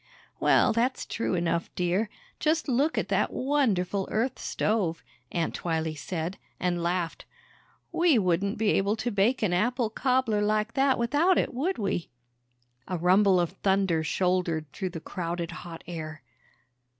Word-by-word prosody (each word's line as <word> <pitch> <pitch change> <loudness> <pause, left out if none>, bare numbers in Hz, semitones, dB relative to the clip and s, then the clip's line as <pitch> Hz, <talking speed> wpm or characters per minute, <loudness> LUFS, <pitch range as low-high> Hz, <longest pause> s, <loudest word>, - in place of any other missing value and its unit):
"Well, - - +4
that's 245 +3 0
true 225 - -2
enough, 170 -1 0
dear. 185 +5 0 0.3
Just 315 +1 +1
look 275 +5 +1
at - - -1
that - - +1
wonderful 210 -9 0
Earth 240 +4 -1
stove," 185 -7 -1 0.3
Aunt 170 -2 -1
Twylee 160 -2 -2
said, 165 +4 -4 0.2
and 175 -1 0
laughed. 170 -1 -2 0.7
"We 335 -6 +4
wouldn't 190 0 +1
be 220 0 +1
able 200 +2 +2
to 225 +2 -2
bake 215 +5 +2
an 185 -4 +2
apple 235 +4 +1
cobbler 250 -3 +1
like 215 +1 +1
that 270 -1 +3
without 295 +10 +3
it, - - 0
would 310 +10 -1
we?" 195 -5 -2 0.8
A 180 - -2
rumble 185 +2 +4
of 175 -1 0
thunder 190 -4 +1
shouldered 180 -1 0
through 190 -2 -3
the 170 -2 -6
crowded 170 -2 -4
hot 170 -1 -9
air. 155 -3 -7
195 Hz, 150 wpm, -27 LUFS, 175-235 Hz, 0.8 s, Well